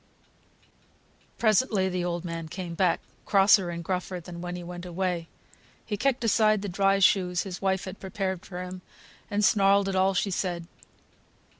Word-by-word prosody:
Presently 215 Hz, -3 st, +2 dB
the 180 Hz, -1 st, -2 dB
old 175 Hz, 0 st, -3 dB
man 165 Hz, -1 st, -5 dB
came 175 Hz, +1 st, -6 dB
back, 180 Hz, -1 st, +1 dB, 0.2 s
crosser 195 Hz, -2 st, +5 dB
and 170 Hz, 0 st, -5 dB
gruffer 180 Hz, +1 st, -3 dB
than 170 Hz, 0 st, -9 dB
when 175 Hz, 0 st, -4 dB
he 175 Hz, -, -6 dB
went 175 Hz, 0 st, -7 dB
away. 180 Hz, -1 st, -2 dB, 0.6 s
He 210 Hz, -, -2 dB
kicked 255 Hz, +2 st, 0 dB
aside 215 Hz, -2 st, +3 dB
the -, -, -3 dB
dry 195 Hz, +2 st, +2 dB
shoes 185 Hz, -2 st, +3 dB
his 185 Hz, -3 st, -7 dB
wife 190 Hz, -1 st, 0 dB
had 185 Hz, -, -8 dB
prepared 190 Hz, -2 st, -3 dB
for 180 Hz, -1 st, -6 dB
him, 180 Hz, 0 st, -8 dB, 0.5 s
and 205 Hz, 0 st, +1 dB
snarled 200 Hz, -1 st, +4 dB
at 195 Hz, -, -1 dB
all 190 Hz, +1 st, +3 dB
she 195 Hz, +2 st, 0 dB
said. 175 Hz, -2 st, -2 dB
185 Hz, 165 wpm, -27 LUFS, 175-195 Hz, 0.6 s, crosser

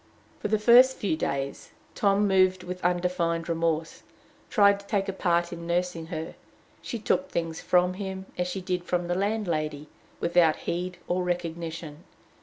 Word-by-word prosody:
For -, -, -2 dB
the 215 Hz, +1 st, +2 dB
first 245 Hz, +4 st, +6 dB
few 195 Hz, -6 st, 0 dB
days, 140 Hz, -3 st, -3 dB, 0.2 s
Tom, 200 Hz, 0 st, +2 dB
moved 185 Hz, -1 st, +3 dB
with 180 Hz, 0 st, -6 dB
undefined 175 Hz, -2 st, 0 dB
remorse, 165 Hz, -1 st, -1 dB, 0.5 s
tried 200 Hz, -2 st, +5 dB
to 200 Hz, -, -15 dB
take 200 Hz, -2 st, 0 dB
a 195 Hz, -, -2 dB
part 175 Hz, -2 st, +1 dB
in 170 Hz, 0 st, -7 dB
nursing 175 Hz, -1 st, -1 dB
her. 160 Hz, -2 st, -5 dB, 0.5 s
She 235 Hz, -, -4 dB
took 185 Hz, -4 st, 0 dB
things 165 Hz, -1 st, -3 dB
from 180 Hz, 0 st, +3 dB
him, 190 Hz, 0 st, -5 dB
as 180 Hz, 0 st, -1 dB
she 190 Hz, +1 st, -4 dB
did 180 Hz, -1 st, -2 dB
from 175 Hz, 0 st, -1 dB
the 175 Hz, -, 0 dB
landlady, 170 Hz, -8 st, -1 dB, 0.3 s
without 170 Hz, -2 st, +3 dB
heed 180 Hz, +1 st, -3 dB
or 180 Hz, +1 st, 0 dB
recognition. 170 Hz, -2 st, -4 dB
180 Hz, 160 wpm, -27 LUFS, 165-190 Hz, 0.5 s, first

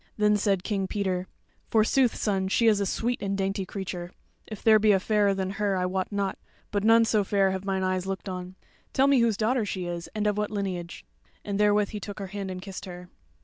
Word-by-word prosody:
Then 210 Hz, 0 st, +4 dB
said 200 Hz, -3 st, +1 dB
King 195 Hz, -2 st, -1 dB
Peter; 185 Hz, -2 st, -2 dB, 0.4 s
"Forsooth, 230 Hz, +3 st, +3 dB
son, 195 Hz, -3 st, 0 dB
she 230 Hz, +4 st, +2 dB
is 215 Hz, -3 st, +5 dB
a 200 Hz, -, 0 dB
sweet 240 Hz, +6 st, -1 dB
and 195 Hz, 0 st, -1 dB
dainty 195 Hz, 0 st, -1 dB
creature. 180 Hz, -3 st, -5 dB, 0.4 s
If 215 Hz, -2 st, -8 dB
there 220 Hz, -1 st, +6 dB
be 210 Hz, 0 st, +5 dB
a 190 Hz, -, +3 dB
fairer 205 Hz, 0 st, +2 dB
than 190 Hz, 0 st, -2 dB
her, 200 Hz, -2 st, +1 dB
I 180 Hz, -, 0 dB
wot 185 Hz, +1 st, -2 dB
not; 200 Hz, -2 st, -2 dB, 0.3 s
but 205 Hz, -1 st, 0 dB
none 225 Hz, +1 st, +6 dB
so 215 Hz, -2 st, +2 dB
fair 195 Hz, -1 st, +2 dB
have 190 Hz, 0 st, -4 dB
mine 190 Hz, -1 st, -1 dB
eyes 185 Hz, 0 st, -1 dB
looked 195 Hz, +1 st, -4 dB
on. 185 Hz, 0 st, -6 dB, 0.4 s
Tell 270 Hz, -, +4 dB
me 280 Hz, -2 st, +5 dB
whose 230 Hz, -3 st, +2 dB
daughter 230 Hz, +2 st, +1 dB
she 190 Hz, -3 st, -3 dB
is, 175 Hz, -1 st, -5 dB
and 215 Hz, 0 st, -1 dB
of 210 Hz, 0 st, +1 dB
what 210 Hz, -, -1 dB
lineage?" 185 Hz, -, -4 dB, 0.4 s
And 200 Hz, -1 st, -2 dB
therewith 210 Hz, -1 st, +3 dB
he 210 Hz, -, -5 dB
took 205 Hz, +1 st, -7 dB
her 195 Hz, -2 st, -5 dB
hand 200 Hz, -2 st, -4 dB
and 185 Hz, 0 st, -6 dB
kissed 195 Hz, -1 st, -7 dB
her. 180 Hz, -1 st, -9 dB
200 Hz, 230 wpm, -27 LUFS, 190-210 Hz, 0.4 s, there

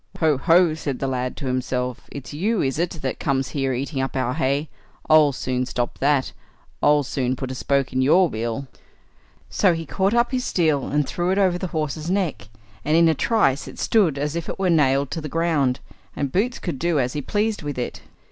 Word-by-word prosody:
"Ho, 155 Hz, -5 st, +2 dB
ho!" 170 Hz, +2 st, +4 dB
said 145 Hz, -4 st, -4 dB
the 135 Hz, -, -3 dB
lad 125 Hz, -1 st, -2 dB
to -, -, -6 dB
himself, 125 Hz, -1 st, -2 dB
"it's 140 Hz, 0 st, -8 dB
you, 205 Hz, +7 st, 0 dB
is 135 Hz, +2 st, -1 dB
it, 175 Hz, 0 st, +1 dB
that 130 Hz, -, -2 dB
comes 135 Hz, -1 st, 0 dB
here 135 Hz, -2 st, -1 dB
eating 135 Hz, +2 st, -2 dB
up 135 Hz, -, -3 dB
our 130 Hz, -1 st, 0 dB
hay? 140 Hz, +1 st, 0 dB, 0.4 s
I'll 155 Hz, -2 st, +6 dB
soon 130 Hz, -1 st, -2 dB
stop 120 Hz, -1 st, -3 dB
that—I'll 145 Hz, +1 st, 0 dB
soon 130 Hz, -1 st, -1 dB
put 130 Hz, 0 st, -5 dB
a -, -, -3 dB
spoke 135 Hz, +1 st, 0 dB
in 130 Hz, -, +1 dB
your 175 Hz, +7 st, +5 dB
wheel." 115 Hz, +1 st, -3 dB, 0.9 s
So 185 Hz, -4 st, +3 dB
he 165 Hz, 0 st, -5 dB
caught 195 Hz, +7 st, 0 dB
up 240 Hz, +1 st, +2 dB
his 255 Hz, -1 st, -1 dB
steel 155 Hz, -, +1 dB
and 145 Hz, 0 st, 0 dB
threw 175 Hz, +1 st, -1 dB
it 190 Hz, -, +1 dB
over 185 Hz, -3 st, +2 dB
the 185 Hz, -, -3 dB
horse's 155 Hz, 0 st, -3 dB
neck, 180 Hz, -, -1 dB, 0.3 s
and 155 Hz, +2 st, +2 dB
in 170 Hz, 0 st, +6 dB
a 160 Hz, -, +4 dB
trice 155 Hz, -, +1 dB
it -, -, -10 dB
stood 185 Hz, -11 st, +2 dB
as 145 Hz, +2 st, -2 dB
if 170 Hz, -, -4 dB
it -, -, -4 dB
were 190 Hz, -2 st, +1 dB
nailed 140 Hz, -3 st, +2 dB
to 165 Hz, -, -3 dB
the 155 Hz, -, -6 dB
ground, 145 Hz, -5 st, +1 dB, 0.4 s
and 140 Hz, -2 st, -2 dB
Boots 225 Hz, -, 0 dB
could 165 Hz, -8 st, -5 dB
do 170 Hz, -2 st, +1 dB
as 125 Hz, -1 st, 0 dB
he 150 Hz, -, -2 dB
pleased 210 Hz, +7 st, -1 dB
with 145 Hz, -3 st, -5 dB
it. 125 Hz, -, -4 dB
145 Hz, 215 wpm, -23 LUFS, 130-170 Hz, 0.9 s, I'll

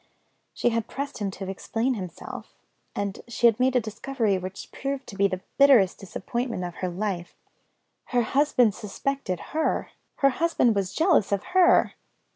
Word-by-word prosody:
She -, -, +2 dB
had 230 Hz, -1 st, -1 dB
pressed 280 Hz, -2 st, -5 dB
him 205 Hz, -2 st, -1 dB
to 195 Hz, 0 st, -7 dB
explain 225 Hz, +6 st, -1 dB
himself 185 Hz, -7 st, -8 dB, 0.4 s
and 200 Hz, -1 st, -3 dB
she 235 Hz, 0 st, -1 dB
had 230 Hz, -1 st, +5 dB
made 260 Hz, +1 st, +2 dB
a -, -, +6 dB
discovery 225 Hz, 0 st, -1 dB
which 185 Hz, +1 st, -8 dB
proved 275 Hz, 0 st, -4 dB
to 200 Hz, -, -10 dB
be 200 Hz, 0 st, +3 dB
the 185 Hz, -1 st, -4 dB, 0.2 s
bitterest 255 Hz, -10 st, +6 dB
disappointment 230 Hz, +2 st, -4 dB
of 175 Hz, -1 st, -4 dB
her 185 Hz, -, -2 dB
life. 180 Hz, -1 st, -3 dB, 0.7 s
Her 245 Hz, -1 st, +1 dB
husband 250 Hz, -3 st, +3 dB
suspected 210 Hz, -2 st, -3 dB
her! 315 Hz, 0 st, 0 dB, 0.2 s
Her 275 Hz, -, +4 dB
husband 255 Hz, -5 st, +2 dB
was 195 Hz, -2 st, -2 dB
jealous 320 Hz, -, +3 dB
of 200 Hz, -, 0 dB
her! 365 Hz, -1 st, +5 dB
225 Hz, 160 wpm, -26 LUFS, 195-270 Hz, 0.7 s, a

